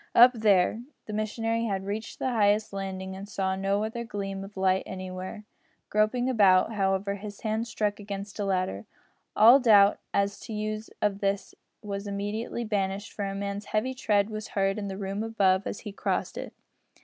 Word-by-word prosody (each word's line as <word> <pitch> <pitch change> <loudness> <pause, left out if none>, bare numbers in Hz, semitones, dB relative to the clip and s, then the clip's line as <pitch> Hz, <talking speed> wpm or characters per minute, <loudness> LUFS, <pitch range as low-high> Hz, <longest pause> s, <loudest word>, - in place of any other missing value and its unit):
"Up 245 +2 +9
there!" 215 -1 +3 0.2
The 215 - -6
missionary 225 +2 -1
had 195 -3 -2
reached 210 +3 -4
the 260 - -1
highest 215 -1 +2
landing, 190 -1 -4
and 200 +2 -8
saw 190 -2 -1
no 195 +2 0
other 230 +2 -3
gleam 195 -3 -4
of 195 0 -11
light 190 0 +3
anywhere. 185 +2 -6 0.4
Groping 215 +4 +2
about, 205 -4 +4
however, 195 -1 0
his 205 0 -8
hand 220 +1 -1
struck 210 -2 -1
against 200 0 -6
a 205 - 0
ladder. 185 - -1 0.5
All 235 +6 +8
doubt 205 -5 +6
as 200 0 0
to - - -11
the 215 -2 -4
use 215 +1 -3
of 200 -1 +1
this 200 0 -1 0.3
was 200 0 -4
immediately 205 +4 -3
banished, 200 -2 -2
for 205 - -3
a 195 0 -3
man's 200 +1 -4
heavy 220 +5 -1
tread 210 -4 +1
was 215 0 -5
heard 195 +1 +2
in 200 - -4
the 190 -1 -5
room 195 +1 -3
above 200 -4 +2
as - - -5
he 210 - -6
crossed 200 - -2
it. - - -6
205 Hz, 185 wpm, -28 LUFS, 195-215 Hz, 0.5 s, Up